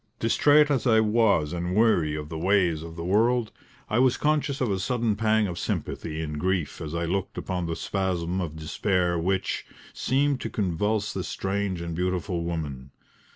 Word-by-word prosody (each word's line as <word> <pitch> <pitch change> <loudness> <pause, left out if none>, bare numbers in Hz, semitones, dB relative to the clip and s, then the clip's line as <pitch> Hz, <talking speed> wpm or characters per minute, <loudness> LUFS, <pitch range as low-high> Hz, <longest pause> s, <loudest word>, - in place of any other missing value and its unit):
Distrait 145 +6 +4
as 130 -4 +1
I 110 -2 +5
was 105 -8 +2
and 90 +1 -2
weary 90 -9 +3
of 75 -1 -5
the 80 - -5
ways 90 -3 +2
of 80 0 -8
the 85 0 -5
world, 115 +4 +2 0.4
I 110 - +1
was 130 -1 +4
conscious 150 -2 0
of 125 -5 0
a 95 - 0
sudden 115 0 0
pang 110 0 +2
of 90 -3 -4
sympathy 80 -1 -3
and 75 -1 -4
grief 95 -2 -1
as 80 +1 -5
I 85 0 -1
looked 95 +3 -2
upon 90 -2 -3
the 85 - -2
spasm 95 -2 -1
of 80 -3 -4
despair 85 +3 0
which, 95 +2 -1 0.3
seemed 140 0 +1
to - - -3
convulse 105 +2 -1
this 95 - -3
strange 95 -2 -2
and 85 -1 -4
beautiful 90 0 -1
woman. 75 -6 -4
95 Hz, 180 wpm, -26 LUFS, 85-110 Hz, 0.4 s, I